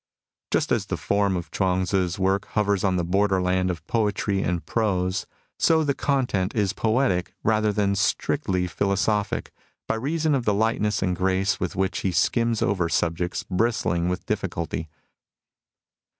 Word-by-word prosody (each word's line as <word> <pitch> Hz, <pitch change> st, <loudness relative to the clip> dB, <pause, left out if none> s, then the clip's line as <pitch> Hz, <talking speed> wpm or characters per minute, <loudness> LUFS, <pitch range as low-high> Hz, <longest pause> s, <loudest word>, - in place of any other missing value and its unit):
Just -, -, 0 dB
as -, -, +1 dB
the -, -, -2 dB
form 100 Hz, -2 st, +1 dB
of 85 Hz, -2 st, -6 dB
Chuang 95 Hz, -1 st, +1 dB
Tzu's 90 Hz, -1 st, 0 dB
work 95 Hz, 0 st, +1 dB
hovers 100 Hz, -2 st, +2 dB
on 95 Hz, -2 st, +2 dB
the 90 Hz, -, 0 dB
borderland 95 Hz, 0 st, +1 dB
of 85 Hz, -3 st, -4 dB
poetry 105 Hz, -2 st, 0 dB
and 90 Hz, -2 st, -2 dB
prose, 95 Hz, -4 st, 0 dB, 0.3 s
so 160 Hz, -1 st, +4 dB
the 145 Hz, -2 st, +1 dB
content 125 Hz, -10 st, 0 dB
is 100 Hz, -3 st, +1 dB
poetic 110 Hz, -5 st, 0 dB
rather 110 Hz, -1 st, +2 dB
than 100 Hz, -1 st, +1 dB
strictly 95 Hz, -1 st, 0 dB
philosophic, 100 Hz, +3 st, 0 dB, 0.4 s
by -, -, +1 dB
reason 150 Hz, +7 st, 0 dB
of 135 Hz, -3 st, +1 dB
the 105 Hz, -3 st, +1 dB
lightness 105 Hz, -1 st, +1 dB
and 90 Hz, -1 st, 0 dB
grace 95 Hz, +1 st, +1 dB
with 90 Hz, -, -3 dB
which 95 Hz, +1 st, 0 dB
he 95 Hz, -, -1 dB
skims 115 Hz, +4 st, +1 dB
over 90 Hz, -4 st, +1 dB
subjects 85 Hz, +2 st, -1 dB
bristling 90 Hz, -4 st, 0 dB
with 90 Hz, +1 st, -3 dB
difficulty. 85 Hz, -6 st, -3 dB
95 Hz, 150 wpm, -24 LUFS, 90-105 Hz, 0.4 s, so